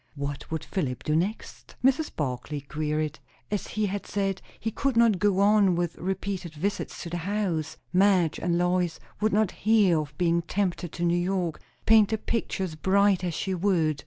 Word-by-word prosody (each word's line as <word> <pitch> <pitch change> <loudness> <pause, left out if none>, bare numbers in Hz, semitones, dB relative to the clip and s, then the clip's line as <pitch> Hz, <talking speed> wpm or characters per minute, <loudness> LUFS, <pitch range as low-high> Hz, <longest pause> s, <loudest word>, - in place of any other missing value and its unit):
What 140 -1 -5
would 160 -1 -3
Philip 140 -10 -3
do 150 - 0
next? 190 +7 -3
Mrs. 270 +4 +3
Barclay 145 +1 -3
queried. 150 +1 -2 0.3
As 205 - -2
he 215 0 -1
had 200 0 -3
said, 195 -2 -1 0.2
he 225 - -2
could 270 +1 -1
not 230 -5 +5
go 200 0 +2
on 200 -3 +5
with 175 -1 -1
repeated 190 -2 -3
visits 195 +7 -3
to 170 - -7
the 175 - -2
house. 175 -4 -2 0.2
Madge 185 -4 +3
and 170 -1 0
Lois 175 -1 +1 0.2
would 215 +1 +2
not 210 -1 +2
hear 205 -6 +3
of 150 -1 -6
being 170 -1 +2
tempted 175 -1 -2
to 175 - -4
New 170 0 +3
York, 175 -2 -1 0.2
paint 220 -2 +6
the 220 - 0
picture 215 -3 -2
as 180 -4 -3
bright 190 +3 +3
as 175 -3 -2
she 190 - -2
would. 170 -5 +1
180 Hz, 185 wpm, -27 LUFS, 160-205 Hz, 0.3 s, paint